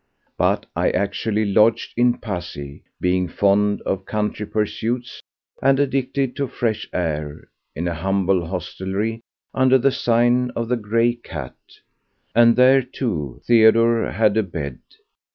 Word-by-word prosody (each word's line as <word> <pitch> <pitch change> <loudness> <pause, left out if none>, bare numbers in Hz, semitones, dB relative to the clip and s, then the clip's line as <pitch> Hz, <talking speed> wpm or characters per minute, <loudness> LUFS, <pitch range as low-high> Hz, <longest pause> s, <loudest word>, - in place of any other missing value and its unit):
But - - +1
I - - +2
actually 105 +2 -1
lodged 105 +3 +2
in 120 0 +2
Passy—being 90 0 -4
fond 100 +3 +1
of 95 0 -2
country 105 -1 -2
pursuits 115 +3 -3 0.4
and 135 0 +3
addicted 135 -1 -1
to 140 - -1
fresh 110 -3 -3
air—in 75 0 -5
a 85 - -1
humble 95 +1 0
hostelry 95 +5 -4 0.3
under 130 0 +4
the 135 +2 +2
sign 120 +1 +2
of 115 0 -3
the 125 - +2
"Grey 115 +2 +1
Cat"; 80 - -8 0.8
and 115 +1 +5
here, 130 +2 +6
too, 110 - -4
Theodore 115 0 +4
had 105 0 +2
a - - +4
bed. 80 - -6
110 Hz, 125 wpm, -21 LUFS, 95-120 Hz, 0.8 s, here